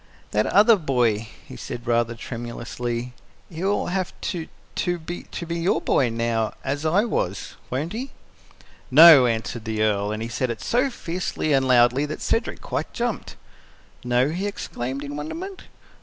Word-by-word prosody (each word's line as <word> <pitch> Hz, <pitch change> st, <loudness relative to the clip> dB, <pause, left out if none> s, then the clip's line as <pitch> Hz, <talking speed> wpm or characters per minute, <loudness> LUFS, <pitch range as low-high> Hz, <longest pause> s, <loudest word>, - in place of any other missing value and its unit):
"That 105 Hz, +1 st, +1 dB
other 215 Hz, +2 st, +6 dB
boy," 120 Hz, -, +1 dB, 0.2 s
he -, -, -10 dB
said 120 Hz, -1 st, -7 dB
rather 120 Hz, -1 st, +1 dB
tremulously 120 Hz, +1 st, -5 dB, 0.4 s
"he 165 Hz, +2 st, -6 dB
will 200 Hz, +1 st, +1 dB
have 185 Hz, 0 st, -3 dB
to 165 Hz, -3 st, -5 dB, 0.3 s
to 175 Hz, -1 st, 0 dB
be 170 Hz, +1 st, -7 dB, 0.3 s
your 170 Hz, +2 st, +1 dB
boy 125 Hz, -, +2 dB
now 115 Hz, -1 st, -1 dB
as 145 Hz, +3 st, -1 dB
I 195 Hz, +8 st, +3 dB
was 95 Hz, -, -2 dB, 0.2 s
won't 145 Hz, +8 st, -2 dB
he?" 255 Hz, +5 st, -4 dB, 0.8 s
"NO!" 150 Hz, -2 st, +9 dB
answered 115 Hz, 0 st, -2 dB
the 110 Hz, -1 st, -1 dB
Earl 105 Hz, -1 st, +1 dB
and 110 Hz, +1 st, -3 dB
he -, -, -3 dB
said 120 Hz, +2 st, -2 dB
it 115 Hz, -, -3 dB
so 255 Hz, +4 st, +1 dB
fiercely 170 Hz, -, -2 dB
and 135 Hz, -1 st, +3 dB
loudly 125 Hz, +3 st, +4 dB
that 155 Hz, -, -5 dB
Cedric -, -, -1 dB
quite -, -, -3 dB
jumped. -, -, -3 dB, 0.7 s
"No?" 125 Hz, +2 st, +2 dB
he 185 Hz, +6 st, -2 dB
exclaimed, 135 Hz, -8 st, -4 dB
in 145 Hz, 0 st, -6 dB
wonderment. 345 Hz, -, -6 dB
130 Hz, 155 wpm, -24 LUFS, 115-170 Hz, 0.8 s, NO